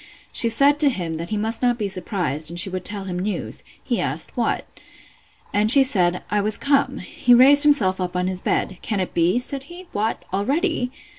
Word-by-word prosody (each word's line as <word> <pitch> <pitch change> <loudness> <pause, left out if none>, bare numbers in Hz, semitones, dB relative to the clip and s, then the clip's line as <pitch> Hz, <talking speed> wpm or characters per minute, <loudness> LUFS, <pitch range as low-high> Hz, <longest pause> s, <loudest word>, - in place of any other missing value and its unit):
She 230 - +4
said 280 +5 +2
to 295 -2 +6
him, 175 -9 -4
that 170 +1 -6
he 215 - -2
must 220 +2 -3
not 245 -1 +1
be 210 -3 -2
surprised, 175 - -3
and 170 +1 -2
she 185 +2 +2
would 185 -1 -5
tell 205 0 -4
him 180 -2 -5
news. 200 +2 -4 0.2
He - - -2
asked, - - -2
What? - - -1 0.9
And 210 +1 +1
she 270 +3 +9
said, 180 -9 0
I 210 0 +1
was 210 0 0
come. 280 0 0
He 245 - +1
raised 275 +4 +6
himself 205 -12 +3
up 180 0 -4
in 180 0 -1
his 185 0 -3
bed; 185 -3 -2
Can 210 -3 -3
it 185 - -3
be? 170 +6 +1
said 270 +2 -2
he—What, 315 - -5
already! 265 - -1
210 Hz, 205 wpm, -21 LUFS, 185-260 Hz, 0.9 s, she